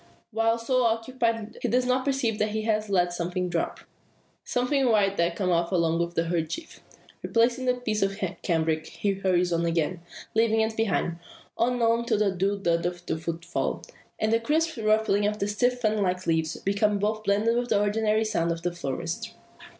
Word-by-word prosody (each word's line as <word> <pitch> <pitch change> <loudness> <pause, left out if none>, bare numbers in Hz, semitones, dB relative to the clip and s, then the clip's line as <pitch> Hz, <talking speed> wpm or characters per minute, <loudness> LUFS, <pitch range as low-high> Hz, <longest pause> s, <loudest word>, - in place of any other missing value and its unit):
While 225 +1 +2
so 255 +2 +1
occupied, 230 -1 -1
he - - 0
does 250 +1 +2
not 255 +1 +1
perceive 260 -6 0
that 215 - +1
he 215 +1 -2
has 215 -1 0
let 180 -3 +2
something 180 +1 -2
drop 170 -1 -2 0.6
something 250 +1 +1
white 200 -3 +3
that 170 0 +1
came 185 -1 0
out 170 +1 +1
along 165 -2 +2
with 170 0 -2
the 165 0 0
kerchief. 170 - -3 0.4
Replacing 240 +3 +1
the 250 - +3
piece 220 -4 -2
of 195 0 0 0.2
cambric 160 -2 0
he 205 - -1
hurries 180 -2 +1
on 170 0 +1
again, 170 +1 0 0.3
leaving 225 0 +3
it 220 0 0
behind; 190 -6 0 0.4
on, 245 +1 +1
on, 230 +1 +2
till 235 - +1
the 205 -1 +2
dull 195 +2 0
thud 170 -3 +1
of 175 0 -4
his 160 - -3
footfall, 170 0 -3 0.3
and 215 +1 +1
the 230 - +4
crisp 315 +5 0
rustling 215 -1 +2
of 210 0 -1
the 200 - -1
stiff 245 +4 +1
fan 215 -2 +1
like 185 -1 0
leaves, 160 -1 0
become 205 +1 +1
both 215 +2 -1
blended 215 +3 +2
with 245 0 -1
the - - +3
ordinary 215 +1 +1
noises 210 -6 0
of 165 0 -4
the 175 - 0
forest. 140 -6 -4
210 Hz, 190 wpm, -26 LUFS, 175-230 Hz, 0.6 s, the